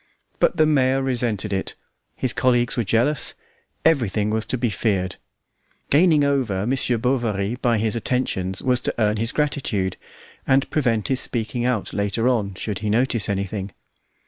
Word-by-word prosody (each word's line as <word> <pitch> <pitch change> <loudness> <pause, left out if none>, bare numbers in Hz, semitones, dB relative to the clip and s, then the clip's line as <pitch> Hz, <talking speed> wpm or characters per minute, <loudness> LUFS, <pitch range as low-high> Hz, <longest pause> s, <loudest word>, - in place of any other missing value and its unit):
But - - +2
the 155 - +5
mayor 135 -3 +2
resented 115 -6 0
it, 95 - -3 0.4
his 130 - -1
colleagues 120 -1 +2
were 120 - 0
jealous, 120 +7 +1 0.5
everything 110 - +2
was 110 0 -1
to 130 - -1
be 120 -2 0
feared; 95 -5 -1 0.7
gaining 155 0 +5
over 125 -9 0
Monsieur 125 -1 +1
Bovary 115 -4 0
by 120 -3 +1
his 110 0 -1
attentions 95 -6 -2
was 125 -1 +2
to - - -2
earn 105 -1 +1
his 115 +2 -1
gratitude, 135 -11 -1 0.5
and 135 +1 +3
prevent 115 -8 0
his 130 -1 +4
speaking 120 +1 -1
out 125 -5 -1
later 100 +3 0
on, 105 -6 0
should 100 0 -4
he 105 - -3
notice 115 -1 +1
anything. 100 -1 -3
115 Hz, 155 wpm, -22 LUFS, 105-130 Hz, 0.7 s, the